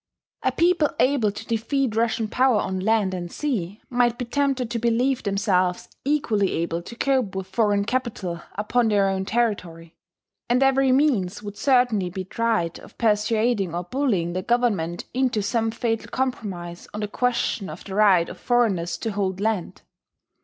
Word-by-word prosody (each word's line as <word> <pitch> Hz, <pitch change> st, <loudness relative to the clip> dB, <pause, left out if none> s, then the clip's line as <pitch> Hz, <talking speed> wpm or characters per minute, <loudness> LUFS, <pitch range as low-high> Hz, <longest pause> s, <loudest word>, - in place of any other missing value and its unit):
A -, -, +1 dB
people 340 Hz, -3 st, +3 dB
able 255 Hz, -6 st, +3 dB
to 205 Hz, -, -9 dB
defeat 235 Hz, +1 st, -1 dB
Russian 225 Hz, 0 st, +1 dB
power 250 Hz, 0 st, +3 dB
on 190 Hz, -1 st, -2 dB
land 205 Hz, -1 st, +1 dB
and 175 Hz, -1 st, -5 dB
sea 210 Hz, -, -3 dB
might 240 Hz, -1 st, +1 dB
be 250 Hz, -, -3 dB
tempted 265 Hz, -2 st, 0 dB
to 235 Hz, -, -1 dB
believe 240 Hz, +3 st, +1 dB
themselves 195 Hz, -3 st, 0 dB
equally 230 Hz, -9 st, +1 dB
able 170 Hz, 0 st, -2 dB
to 235 Hz, -, -10 dB
cope 255 Hz, -6 st, 0 dB
with 190 Hz, -1 st, -3 dB
foreign 205 Hz, 0 st, +1 dB
capital 205 Hz, -8 st, -2 dB
upon 225 Hz, +3 st, +1 dB
their 205 Hz, -2 st, +3 dB
own 190 Hz, 0 st, -1 dB
territory; 180 Hz, -8 st, -2 dB, 0.6 s
and 250 Hz, +2 st, +3 dB
every 270 Hz, 0 st, +3 dB
means 230 Hz, -9 st, +1 dB
would 205 Hz, -1 st, -7 dB
certainly 245 Hz, -7 st, +2 dB
be 185 Hz, +1 st, -5 dB
tried 215 Hz, -4 st, -1 dB
of -, -, -16 dB
persuading 215 Hz, -3 st, +1 dB
or 175 Hz, -, -2 dB
bullying 190 Hz, -6 st, 0 dB
the 185 Hz, -, -2 dB
government 200 Hz, -7 st, 0 dB
into 250 Hz, -4 st, +1 dB
some 225 Hz, +2 st, 0 dB
fatal 225 Hz, 0 st, -2 dB
compromise 195 Hz, -10 st, -4 dB
on 210 Hz, -, -3 dB
the 210 Hz, -, -1 dB
question 235 Hz, -3 st, -1 dB
of 155 Hz, +3 st, -9 dB
the 190 Hz, -, -8 dB
right 195 Hz, -4 st, +4 dB
of 180 Hz, -, -9 dB
foreigners 200 Hz, -9 st, +1 dB
to 225 Hz, -, -3 dB
hold 195 Hz, -2 st, -2 dB
land. 210 Hz, -4 st, -2 dB
215 Hz, 165 wpm, -24 LUFS, 190-245 Hz, 0.6 s, right